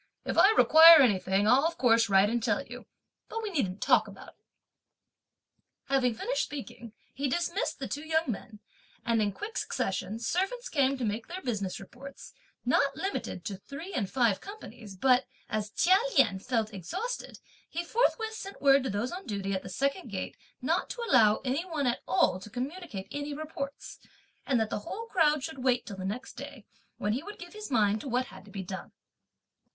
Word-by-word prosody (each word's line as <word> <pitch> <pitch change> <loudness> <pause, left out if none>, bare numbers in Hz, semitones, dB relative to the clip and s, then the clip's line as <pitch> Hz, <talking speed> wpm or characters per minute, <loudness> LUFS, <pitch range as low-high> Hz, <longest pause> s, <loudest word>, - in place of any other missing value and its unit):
If - - -2
I 395 - +7
require 325 0 +9
anything, 195 -3 +2
I'll 255 +5 +5
of 335 0 -5
course 230 -3 +4
write 195 +1 +5
and 235 +2 0
tell - - 0
you, - - -10 0.4
but 455 0 -4
we 425 - -3
needn't 205 - -1
talk - - +4
about - - -11
it." - - -25 1.4
Having 255 -4 +2
finished - - -1
speaking, 240 -5 -7 0.2
he 275 0 -2
dismissed 345 +6 -1
the - - -5
two 290 - -4
young 320 0 +1
men; 215 -3 -6 0.4
and, 230 -2 +2
in 205 -1 +1
quick 415 - -7
succession, 190 +2 -2
servants 390 - -2
came 275 - +2
to 250 - -2
make 215 +2 -3
their 370 +2 -7
business 205 -7 -2
reports, 265 +8 -11 0.3
not - - +2
limited 380 - -4
to 195 - -4
three 285 - -9
and 205 - -1
five 235 -7 +2
companies, 315 - -10
but 255 +6 +3 0.2
as 215 -1 -2
Chia 365 - +4 0.2
Lien 215 -8 +4
felt 225 -1 -1
exhausted, 375 - -5 0.3
he 345 - -3
forthwith 445 +3 +1
sent 395 -2 -8
word 275 -1 +5
to 265 - -2
those 205 +5 -2
on 370 +2 -7
duty 195 -2 -2
at 190 - -1
the - - -9
second 280 +7 -1
gate - - -5 0.3
not - - 0
to 475 -1 -4
allow 215 - +5
any 270 +6 0
one 320 -6 -3
at 245 -1 0
all 250 -7 +2
to 200 - -11
communicate 255 - -5
any 290 0 -4
reports, 290 -2 -6 0.5
and 260 -4 +2
that 220 -1 -1
the - - -1
whole 445 - -6
crowd 305 -9 +2
should 270 -5 -6
wait 250 -2 +2
till 200 - -8
the 185 - -6
next 215 +7 -5
day, 280 -3 -9 0.3
when 210 +1 -1
he 255 - -2
would 415 +6 -9
give 350 0 -11
his 425 0 -7
mind 215 -4 +2
to 270 - -6
what 250 +1 +1
had 190 -5 -13
to - - -15
be 195 -1 -6
done. 190 +1 -7
255 Hz, 195 wpm, -29 LUFS, 210-325 Hz, 1.4 s, require